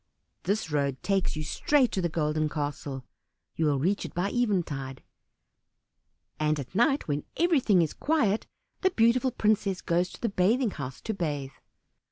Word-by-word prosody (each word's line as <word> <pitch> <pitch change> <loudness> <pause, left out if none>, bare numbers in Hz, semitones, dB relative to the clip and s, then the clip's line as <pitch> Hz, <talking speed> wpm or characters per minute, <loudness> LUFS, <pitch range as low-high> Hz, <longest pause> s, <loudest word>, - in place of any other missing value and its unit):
This 200 -3 -1
road 140 -3 -1
takes 195 -4 +1
you 155 - -3
straight 265 - +2
to 190 - -1
the 170 - 0
Golden 155 -1 0
Castle, 145 -3 -4 0.5
you 160 - 0
will 145 -2 +2
reach 185 +9 0
it - - -8
by 180 +3 0
eventide; 160 - -1 1.4
and 155 0 +1
at 135 +2 -7
night 270 +8 +2
when 145 -1 -1
everything 270 - +4
is 155 - -3
quiet 235 -10 +1 0.3
the 375 - +4
beautiful 240 -3 +3
princess 210 -5 +1
goes 175 +1 0
to - - -12
the 235 - 0
bathing 210 +5 +2
house 130 -5 -7
to 220 - -3
bathe. 145 -8 -3
180 Hz, 160 wpm, -28 LUFS, 150-220 Hz, 1.4 s, everything